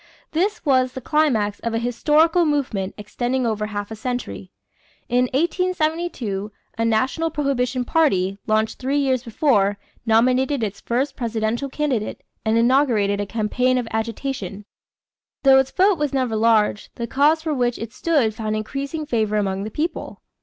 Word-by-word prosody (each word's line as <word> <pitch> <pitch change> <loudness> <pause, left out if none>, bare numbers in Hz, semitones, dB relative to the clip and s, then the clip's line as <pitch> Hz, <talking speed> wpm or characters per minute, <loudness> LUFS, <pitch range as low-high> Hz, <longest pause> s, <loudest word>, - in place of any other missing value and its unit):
This 380 +6 -1
was 255 -3 +3
the - - -5
climax 250 -8 +1
of 230 -1 -3
a - - +2
historical 305 +8 +3
movement 255 - -1
extending 245 +4 -2
over 215 -2 -1
half 205 0 -5
a - - -4
century. 235 -4 -5 0.6
In 250 +1 +3
1872, 310 - -1 0.2
a 230 - -1
National 255 +9 +1
Prohibition 255 -4 -1
party, 195 - +1
launched 220 0 +1
three 270 +2 0
years 265 -3 +1
before, 220 -5 +1 0.3
nominated 255 +3 +2
its 205 -2 -4
first 265 +4 -1
presidential 230 +2 -2
candidate 265 -7 -2 0.2
and 220 +1 +2
inaugurated 230 -5 +3
a 205 - -4
campaign 250 +4 +1
of 245 -2 -2
agitation. 220 -3 -4 0.8
Though 270 -1 +7
its 265 0 +1
vote 380 +1 +3
was 295 -1 -1
never 255 -4 0
large, 215 -1 +2
the 235 - -3
cause 295 +6 +2
for 315 -2 -1
which 245 -3 0
it 225 0 -7
stood 285 -10 +1
found 215 -1 -3
increasing 275 +8 -4
favor 220 -6 0
among 195 -1 -1
the - - -4
people. 315 +8 -4
245 Hz, 155 wpm, -22 LUFS, 220-285 Hz, 0.8 s, Though